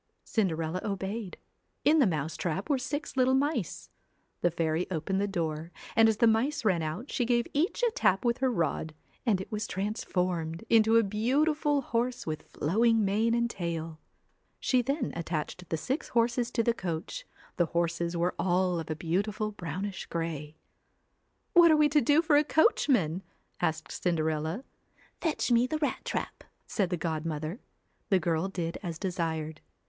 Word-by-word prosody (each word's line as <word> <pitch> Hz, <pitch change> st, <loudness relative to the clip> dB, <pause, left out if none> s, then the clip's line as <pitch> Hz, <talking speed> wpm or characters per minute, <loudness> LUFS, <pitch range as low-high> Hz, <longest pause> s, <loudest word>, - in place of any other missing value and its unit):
Cinderella 170 Hz, -4 st, -1 dB
obeyed. 200 Hz, 0 st, -4 dB, 0.5 s
In 315 Hz, +2 st, +6 dB
the 265 Hz, -, +5 dB
mouse 155 Hz, -3 st, -2 dB
trap 185 Hz, -, -2 dB
were 275 Hz, -, +2 dB
six 290 Hz, +4 st, -4 dB
little 260 Hz, 0 st, +4 dB
mice. 285 Hz, +4 st, -1 dB, 0.5 s
The 175 Hz, -, +4 dB
fairy 165 Hz, 0 st, -1 dB
opened 185 Hz, +3 st, -1 dB
the 205 Hz, -, +1 dB
door 165 Hz, -3 st, -3 dB, 0.2 s
and 225 Hz, 0 st, +6 dB
as 220 Hz, -, +1 dB
the 235 Hz, -, +4 dB
mice 230 Hz, +5 st, +2 dB
ran 185 Hz, -5 st, +3 dB
out, 160 Hz, -, -4 dB
she 250 Hz, -, 0 dB
give 240 Hz, 0 st, +2 dB
each 335 Hz, +11 st, 0 dB
a 475 Hz, -, +4 dB
tap 195 Hz, -, +2 dB
with 235 Hz, +1 st, +2 dB
her 260 Hz, -1 st, +2 dB
rod, 160 Hz, -4 st, -1 dB, 0.3 s
and 205 Hz, -5 st, +3 dB
it 190 Hz, -, -7 dB
was 210 Hz, -1 st, -2 dB
transformed 180 Hz, -4 st, -2 dB
into 225 Hz, 0 st, +5 dB
a 230 Hz, -, +5 dB
beautiful 285 Hz, +8 st, +1 dB
horse 245 Hz, 0 st, -1 dB
with 155 Hz, -1 st, -3 dB
26 -, -, -19 dB
flowing 220 Hz, +7 st, +3 dB
mane 220 Hz, +4 st, +2 dB
and 235 Hz, 0 st, +2 dB
tail. 165 Hz, -6 st, -4 dB, 0.6 s
She 255 Hz, -1 st, +2 dB
then 275 Hz, +5 st, -2 dB
attached 165 Hz, -1 st, -3 dB
the 160 Hz, -, 0 dB
CINDER -, -, -9 dB
six 270 Hz, +4 st, -1 dB
horses 235 Hz, +1 st, +1 dB
to 235 Hz, -1 st, 0 dB
the 235 Hz, -, +2 dB
coach, 190 Hz, -, -5 dB, 0.3 s
the 175 Hz, -, +3 dB
horses 170 Hz, +1 st, -1 dB
were 175 Hz, +2 st, +1 dB
all 180 Hz, -1 st, +2 dB
of 160 Hz, -, -5 dB
a -, -, 0 dB
ELLA -, -, -11 dB
beautiful 205 Hz, +6 st, -1 dB
brownish 190 Hz, 0 st, -5 dB
grey. 160 Hz, -3 st, -4 dB, 1.0 s
'What 345 Hz, -1 st, +8 dB
are 310 Hz, -, +6 dB
we 300 Hz, -1 st, +5 dB
to 295 Hz, 0 st, +4 dB
do 290 Hz, +7 st, +4 dB
for 305 Hz, -3 st, +4 dB
a 295 Hz, -, +5 dB
coachman?' 250 Hz, -, +3 dB, 0.4 s
asked 160 Hz, 0 st, -1 dB
Cinderella. 160 Hz, -, -1 dB, 0.3 s
' -, -, -32 dB
Fetch 315 Hz, -6 st, 0 dB
me 240 Hz, +1 st, +4 dB
the 310 Hz, -, -1 dB
rat 300 Hz, -1 st, -1 dB
trap,' -, -, -4 dB, 0.2 s
said 195 Hz, -5 st, 0 dB
the 180 Hz, -, -1 dB
godmother. 160 Hz, +2 st, -3 dB, 0.5 s
The 195 Hz, -, +5 dB
girl 170 Hz, +1 st, 0 dB
did 170 Hz, -3 st, -4 dB
as 170 Hz, -4 st, -4 dB
desired. 160 Hz, -4 st, -3 dB
195 Hz, 175 wpm, -29 LUFS, 165-240 Hz, 1.0 s, What